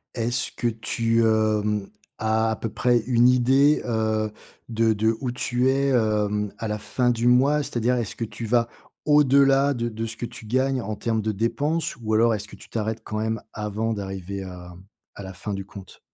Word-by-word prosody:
est-ce 120 +1 -1
que 120 - -1
tu, 115 +1 0
hem, 105 -2 +1 0.3
as 110 +1 +1
à - - -1
peu 115 - -4
près 120 +2 +2
une 120 -1 +4
idée, 135 +4 +4
heu, 110 -2 0 0.4
de 115 -1 +2
de 110 +2 +1
où 125 -3 -2
tu 125 +1 0
es, 140 +1 +2
hem, 105 -4 +1
à 110 - -4
la 105 - -1
fin 125 +4 0
du 120 0 +1
mois? 135 +4 +4
C'est-à-dire, 125 0 0
est-ce 115 -4 -3
que 115 - -4
tu 115 +1 -7
vas 115 +1 +2 0.4
au-delà 140 -1 +4
de 120 -1 -2
de 110 +1 -4
ce 115 0 -5
que 120 - -4
tu 115 -1 -10
gagnes 130 +2 0
en 110 0 -4
termes 110 +1 -1
de 110 0 -1
dépenses, 145 +11 -1
ou 110 0 -2
alors 115 +1 +4
est-ce 105 0 -4
que - - -12
tu - - -16
t'arrêtes 110 0 -3
quand 105 - -5
même 110 0 -2
avant 105 +1 -3
d'arriver 95 -1 -5
à 90 -1 -9 0.4
à 100 - -8
la 95 0 -8
fin 105 +3 -5
du 95 0 -5
compte? 100 -2 -12
115 Hz, 200 wpm, -24 LUFS, 105-125 Hz, 0.4 s, une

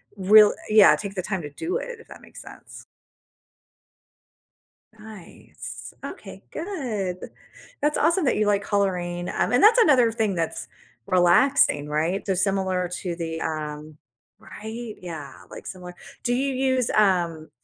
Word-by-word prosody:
real 205 +2 +6 0.2
yeah, 215 -1 +7
take 200 -2 -6
the 185 - -2
time 190 -1 -3
to 145 - -7
do 335 - -4
it, - - -5
if - - -17
that - - -13
makes - - -13
sense? - - -13 2.1
Nice, 215 -4 -11
okay, - - -9
good, 245 - -4
th - - -9 0.5
that's 300 +1 +1
awesome 335 +1 +2
that - - +2
you 210 -1 +1
like 200 -1 +1
coloring, 180 -3 -1
um, - - -1
and 245 - +3
that's 450 +3 +6
another 255 - +5
thing 220 -3 -1
that's 165 -2 -3 0.4
relaxing, 180 - +3
right? 160 +6 -1
So, 195 - 0
similar 190 -1 0
to 175 -3 -4
the, 165 -1 -5
um 155 -1 -5 0.4
right? 220 +1 -8
Yeah, 160 -6 -8 0.2
like, - - -10
similar 180 -1 -9 0.3
do 245 - 0
you 270 +2 0
use, 260 -2 0
um 175 -6 +1
200 Hz, 145 wpm, -24 LUFS, 175-245 Hz, 2.1 s, yeah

